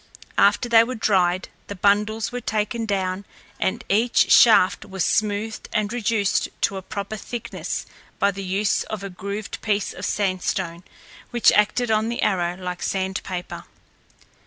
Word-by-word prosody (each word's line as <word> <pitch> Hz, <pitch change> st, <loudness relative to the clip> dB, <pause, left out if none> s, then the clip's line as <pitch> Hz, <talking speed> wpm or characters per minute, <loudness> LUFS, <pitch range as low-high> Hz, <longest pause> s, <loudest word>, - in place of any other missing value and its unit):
After 245 Hz, -, +4 dB
they 230 Hz, -1 st, +6 dB
were 255 Hz, +2 st, -4 dB
dried, 185 Hz, -5 st, +1 dB, 0.2 s
the 200 Hz, -, -6 dB
bundles 210 Hz, +3 st, +1 dB
were 245 Hz, 0 st, -4 dB
taken 220 Hz, +1 st, -2 dB
down 190 Hz, -1 st, -1 dB, 0.4 s
and 220 Hz, +5 st, -1 dB
each 225 Hz, +5 st, +3 dB
shaft 215 Hz, -6 st, +6 dB
was 190 Hz, -4 st, -2 dB
smoothed 215 Hz, +1 st, -1 dB
and 215 Hz, 0 st, -1 dB
reduced 225 Hz, -4 st, 0 dB
to 195 Hz, -, +1 dB
a -, -, -5 dB
proper 200 Hz, +2 st, -5 dB
thickness 235 Hz, +2 st, -5 dB, 0.3 s
by 200 Hz, -, +2 dB
the 195 Hz, 0 st, -7 dB
use 195 Hz, +2 st, 0 dB
of 210 Hz, -2 st, -6 dB
a 195 Hz, -, -6 dB
grooved 200 Hz, +3 st, -6 dB
piece 205 Hz, -2 st, -1 dB
of -, -, -9 dB
sand 190 Hz, -3 st, 0 dB
stone, 175 Hz, -3 st, -3 dB, 0.5 s
which 240 Hz, -3 st, +4 dB
acted 220 Hz, +3 st, +2 dB
on 220 Hz, +1 st, +2 dB
the 235 Hz, -, -2 dB
arrow 180 Hz, -3 st, 0 dB
like 180 Hz, -1 st, -5 dB
sandpaper. 190 Hz, -1 st, -3 dB
205 Hz, 155 wpm, -23 LUFS, 190-220 Hz, 0.5 s, they